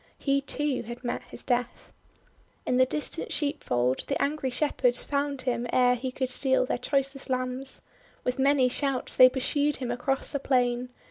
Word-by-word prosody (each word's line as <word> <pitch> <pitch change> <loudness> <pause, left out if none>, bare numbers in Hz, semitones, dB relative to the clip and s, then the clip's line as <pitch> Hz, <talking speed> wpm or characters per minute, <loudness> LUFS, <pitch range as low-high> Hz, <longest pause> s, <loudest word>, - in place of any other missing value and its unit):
He, 275 -1 +1
too, 290 -1 -2
had 240 +2 -9
met 240 - -2
his - - -7
death. 245 -1 -2 0.7
In 250 - +1
the 255 0 +5
distant 300 +4 -1
sheepfold 130 - 0
the 280 - -1
angry 280 -2 0
Shepherds 250 -2 +1
found 280 -1 -2
him 245 -2 -1
ere 250 -1 +4
he 255 +1 -3
could 260 0 -3
steal 260 0 +2
their 250 - -2
choicest 275 +1 -1
lambs. 255 +1 -1 0.4
With 250 +1 -2
many 270 -1 +4
shouts 270 0 -1
they 255 0 +9
pursued 285 +3 0
him 250 -2 -4
across 265 +2 -1
the 280 - -2
plain. 250 -2 +1
260 Hz, 170 wpm, -27 LUFS, 250-280 Hz, 0.7 s, they